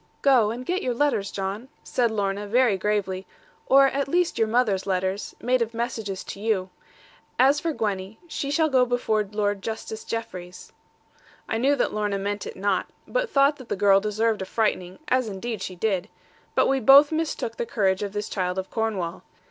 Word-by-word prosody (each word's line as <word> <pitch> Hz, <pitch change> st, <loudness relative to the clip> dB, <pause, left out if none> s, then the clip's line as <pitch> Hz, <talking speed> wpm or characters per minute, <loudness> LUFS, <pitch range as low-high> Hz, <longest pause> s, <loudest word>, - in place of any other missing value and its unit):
'Go, 255 Hz, -6 st, +5 dB
and 240 Hz, +3 st, -5 dB
get 365 Hz, +5 st, -1 dB
your 250 Hz, -2 st, -1 dB
letters, 240 Hz, -7 st, +1 dB
John,' 200 Hz, +5 st, -4 dB, 0.2 s
said 240 Hz, -2 st, +1 dB
Lorna 205 Hz, -1 st, -2 dB
very 240 Hz, -1 st, +3 dB
gravely; 190 Hz, -1 st, -1 dB, 0.4 s
'or 275 Hz, +1 st, +7 dB
at 275 Hz, +1 st, 0 dB
least 350 Hz, +4 st, +1 dB
your 225 Hz, -, +3 dB
mother's 215 Hz, -5 st, +1 dB
letters, 190 Hz, +1 st, -2 dB
made 250 Hz, +1 st, +1 dB
of 230 Hz, 0 st, -2 dB
messages 225 Hz, -5 st, -3 dB
to -, -, -8 dB
you. 200 Hz, -4 st, -1 dB, 0.7 s
As 275 Hz, +3 st, +5 dB
for 330 Hz, -, -1 dB
Gwenny, 205 Hz, -5 st, -3 dB
she 280 Hz, -3 st, -4 dB
shall 315 Hz, +2 st, +2 dB
go 260 Hz, -4 st, +4 dB
before 240 Hz, -3 st, +1 dB
Lord 205 Hz, -1 st, -1 dB
Justice 220 Hz, +1 st, -5 dB
Jeffreys.' 185 Hz, -6 st, -6 dB, 0.7 s
I 225 Hz, -, -1 dB
knew 275 Hz, +4 st, +3 dB
that 260 Hz, -, 0 dB
Lorna 210 Hz, -1 st, -1 dB
meant 200 Hz, +1 st, -3 dB
it -, -, -7 dB
not; 195 Hz, 0 st, 0 dB, 0.2 s
but -, -, -1 dB
thought 280 Hz, +1 st, +3 dB
that 255 Hz, -, -12 dB
the -, -, 0 dB
girl 195 Hz, 0 st, +5 dB
deserved 215 Hz, +1 st, 0 dB
a -, -, -2 dB
frightening; 185 Hz, -3 st, -1 dB
as 255 Hz, -2 st, +2 dB
indeed 210 Hz, +2 st, -5 dB
she 190 Hz, -1 st, -5 dB
did. 190 Hz, 0 st, -1 dB, 0.5 s
But -, -, +4 dB
we 270 Hz, 0 st, +2 dB
both 275 Hz, +5 st, +7 dB
mistook 325 Hz, +9 st, -2 dB
the 480 Hz, -1 st, -3 dB
courage 190 Hz, -, +1 dB
of 205 Hz, -1 st, -3 dB
this 210 Hz, 0 st, -3 dB
child 180 Hz, -1 st, -2 dB
of 190 Hz, 0 st, -4 dB
Cornwall. 200 Hz, -6 st, -2 dB
220 Hz, 190 wpm, -25 LUFS, 195-255 Hz, 0.7 s, or